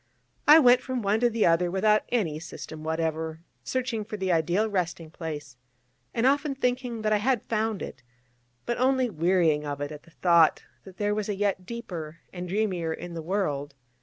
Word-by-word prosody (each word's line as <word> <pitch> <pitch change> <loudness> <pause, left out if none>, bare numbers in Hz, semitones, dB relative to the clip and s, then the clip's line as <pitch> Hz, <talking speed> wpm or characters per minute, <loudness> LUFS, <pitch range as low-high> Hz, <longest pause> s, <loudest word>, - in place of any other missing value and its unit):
I 300 +2 +10
went 250 -4 +6
from 255 -3 -3
one 205 +2 +2
to 240 +1 +3
the 225 -1 +1
other 170 +1 +3
without 210 +4 +2
any 175 -11 0
system 160 -1 -8
whatever, 160 0 -2 0.2
searching 255 -4 -2
for 210 0 -6
the 190 -2 -1
ideal 175 +6 +2
resting 175 -5 -2
place, 150 -6 -7 0.5
and 235 +1 0
often 280 +1 +2
thinking 250 -3 -1
that 215 0 +2
I - - +4
had 240 +1 +1
found 220 -2 -1
it: 130 - -8 0.6
but 240 0 -2
only 260 -1 +2
wearying 165 -3 +2
of 145 -1 -4
it 145 +1 -4
at 150 -1 -8
the - - -20
thought 170 -1 +4 0.2
that 190 -2 -13
there 205 0 0
was 215 0 -2
a 205 - 0
yet 195 -2 -1
deeper 175 -10 -6 0.2
and 180 -1 -6
dreamier 185 -5 0
in 175 +2 -6
the 165 - -5
world. 155 -6 -2
190 Hz, 190 wpm, -27 LUFS, 160-225 Hz, 0.6 s, I